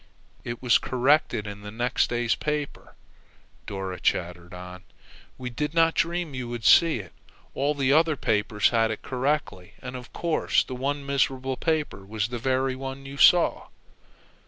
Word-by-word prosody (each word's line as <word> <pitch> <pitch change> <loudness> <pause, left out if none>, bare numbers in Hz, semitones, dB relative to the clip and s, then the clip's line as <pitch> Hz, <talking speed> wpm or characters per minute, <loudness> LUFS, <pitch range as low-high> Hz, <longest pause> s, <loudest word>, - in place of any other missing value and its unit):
"It 120 +1 -6
was 120 -3 +5
corrected 130 -4 +1
in 105 +1 -8
next 120 +1 +1
day's 120 -1 +1
paper," 150 -1 -4 0.7
Dora 95 -2 -5
chattered 85 0 -1
on. 90 0 -9 0.6
"We 125 -1 -6
did 150 +6 -3
not 165 0 +4
dream 170 -2 -1
you 125 -2 -5
would 120 -2 -6
see 165 -4 +6
it. 95 -6 -9 0.4
All 145 +2 0
the 135 -1 +2
other 160 0 +4
papers 105 -4 +1
had 115 -1 +2
it 110 - -5
correctly, 130 -8 -2
and 125 0 -7
of 125 -2 -9
course 170 -2 +1
that 130 - -8
one 140 +2 -3
miserable 135 -1 0
paper 155 - -2
was 105 +1 -3
the 120 -1 -4
very 130 +1 0
one 135 +1 -7
you 140 +1 -8
saw!" 175 +4 +5
130 Hz, 155 wpm, -26 LUFS, 110-145 Hz, 0.7 s, see